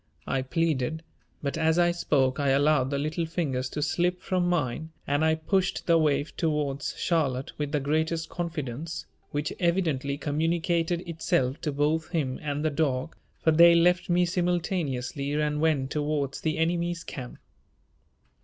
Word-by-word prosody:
I 135 - 0
pleaded, 160 +1 -1 0.4
but 140 +3 -2
as 160 +1 +3
I 175 0 +4
spoke 140 -6 +1
I 140 -1 +2
allowed 140 -1 +3
the 140 - -1
little 155 +3 -1
fingers 135 -6 -2
to 150 - -3
slip 175 +4 0
from 180 -1 0
mine 160 -2 -1 0.2
and 145 +2 +1
I 160 0 +4
pushed 185 +4 0
the 165 -1 +4
waif 145 -1 +1
towards 150 -3 -1
Charlotte 140 -7 0
with 145 -1 -2
the 150 - +1
greatest 160 +3 0
confidence, 160 -2 -4 0.2
which 145 +1 -2
evidently 160 -6 0
communicated 165 +3 0
itself 140 -5 0
to 150 - -1
both 150 +3 0
him 145 -7 -1
and 150 0 -2
the 155 - +2
dog, 140 -1 -1 0.3
for 160 - +5
they 170 +2 +7
left 180 +2 +3
me 175 +1 +4
simultaneously 165 -7 -1
and 150 0 0
went 145 -4 +1
towards 145 -2 -1
the 160 +1 -1
enemy's 170 +1 0
camp. 125 -3 -7
155 Hz, 155 wpm, -27 LUFS, 140-170 Hz, 0.4 s, they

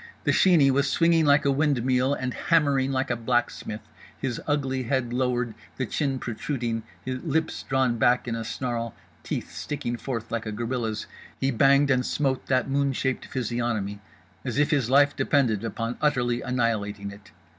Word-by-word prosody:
The - - +2
Sheeney 160 -8 +5
was 140 +1 +2
swinging 165 -1 +3
like 145 +1 +5
a 140 - +4
windmill 135 -2 +2
and 130 -2 -3
hammering 140 -5 +2
like 130 0 0
a - - +1
blacksmith. 115 -2 -1 0.4
His 130 -3 -3
ugly 135 -3 0
head 120 -1 -1
lowered, 125 -2 0 0.2
the 130 - -1
chin 135 +3 -1
protruding, 120 -1 -3 0.2
lips 130 +5 -1
drawn 130 -3 0
back 125 +2 +3
in 120 - -1
a 115 0 -3
snarl, 115 -1 -3 0.3
teeth - - -4
sticking 130 -5 -4
forth 115 -3 -5
like 115 -1 -2
a - - -2
gorilla's, 115 -1 -2 0.3
he 135 - +1
banged 140 +3 +4
and 125 -1 +3
smote 135 -1 -1
that 130 -1 +2
moon 140 0 +1
shaped 130 0 -1
physiognomy 120 -5 -2 0.4
as - - -3
if 145 +2 +3
his 135 -6 +1
life 145 +2 +5
depended 120 -8 +2
upon 115 +2 -3
utterly 125 -5 +1
annihilating 105 -5 -1
it. 100 0 -14
130 Hz, 165 wpm, -26 LUFS, 115-140 Hz, 0.4 s, Sheeney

